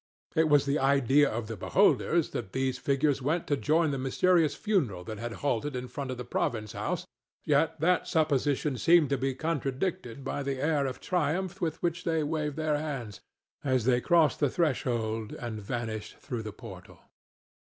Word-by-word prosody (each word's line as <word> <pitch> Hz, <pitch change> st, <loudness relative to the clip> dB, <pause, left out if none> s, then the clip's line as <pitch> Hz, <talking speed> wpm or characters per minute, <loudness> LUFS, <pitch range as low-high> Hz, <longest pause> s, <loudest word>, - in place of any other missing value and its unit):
It 160 Hz, 0 st, +3 dB
was 145 Hz, -1 st, +5 dB
the 140 Hz, +2 st, +1 dB
idea 140 Hz, +1 st, +4 dB
of 115 Hz, +1 st, -3 dB
the 115 Hz, +1 st, -5 dB
beholders 95 Hz, -, +2 dB
that 95 Hz, -, -5 dB
these 130 Hz, -1 st, -1 dB
figures 140 Hz, 0 st, +1 dB
went 155 Hz, +6 st, 0 dB
to 145 Hz, -, +1 dB
join 155 Hz, +6 st, +2 dB
the 135 Hz, -, -2 dB
mysterious 160 Hz, +4 st, +2 dB
funeral 140 Hz, -, 0 dB
that 110 Hz, +1 st, -7 dB
had 120 Hz, 0 st, -4 dB
halted 140 Hz, +1 st, 0 dB
in 125 Hz, 0 st, -4 dB
front 135 Hz, +1 st, -5 dB
of 130 Hz, -, -4 dB
the 125 Hz, -, -6 dB
province 110 Hz, -3 st, -2 dB
house, -, -, -3 dB, 0.4 s
yet -, -, +2 dB
that 180 Hz, +2 st, +2 dB
supposition 145 Hz, -3 st, +1 dB
seemed 165 Hz, -4 st, +5 dB
to 140 Hz, -, +2 dB
be 135 Hz, +1 st, -1 dB
contradicted 140 Hz, -1 st, -2 dB
by 135 Hz, -, -3 dB
the 135 Hz, -1 st, -3 dB
air 145 Hz, -1 st, +1 dB
of 130 Hz, -, -6 dB
triumph 180 Hz, +2 st, -1 dB
with 160 Hz, -3 st, -2 dB
which 175 Hz, 0 st, -1 dB
they 160 Hz, -2 st, +1 dB
waved 150 Hz, -1 st, -2 dB
their 155 Hz, -2 st, 0 dB
hands 135 Hz, -9 st, -5 dB, 0.4 s
as 130 Hz, -4 st, +1 dB
they 125 Hz, -1 st, +3 dB
crossed 165 Hz, -1 st, +3 dB
the 145 Hz, -, +3 dB
threshold 120 Hz, -, -1 dB
and 115 Hz, -3 st, -5 dB
vanished 110 Hz, -1 st, -4 dB
through 120 Hz, -3 st, -5 dB
the 110 Hz, -1 st, -6 dB
portal. 95 Hz, -5 st, -11 dB
140 Hz, 180 wpm, -29 LUFS, 120-155 Hz, 0.4 s, was